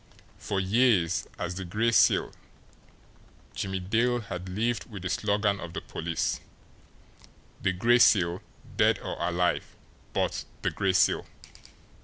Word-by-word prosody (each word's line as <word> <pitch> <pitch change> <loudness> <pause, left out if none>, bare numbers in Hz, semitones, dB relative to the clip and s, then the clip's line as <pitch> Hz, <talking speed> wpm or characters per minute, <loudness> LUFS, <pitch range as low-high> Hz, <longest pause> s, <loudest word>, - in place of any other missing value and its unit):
For 100 - -2
years, 95 -3 +2
as 85 - -3
the 95 +1 -5
Gray 105 +6 0
Seal, - - +4 1.2
Jimmie 95 -1 -3
Dale 115 +6 +1
had 95 -3 -6
lived 115 +7 -1
with 100 -4 -8
the 90 - -2
slogan 100 -1 +1
of 85 -2 -8
the - - -4
police, 85 0 -2 1.2
"The 95 - +2
Gray 115 +7 +3
Seal 90 -6 +4 0.4
dead - - +4
or - - -5
alive 90 +1 0 0.4
but - - -1 0.2
the - - +1
Gray 95 -1 0
Seal!" 90 - +3
95 Hz, 130 wpm, -28 LUFS, 90-110 Hz, 1.2 s, Seal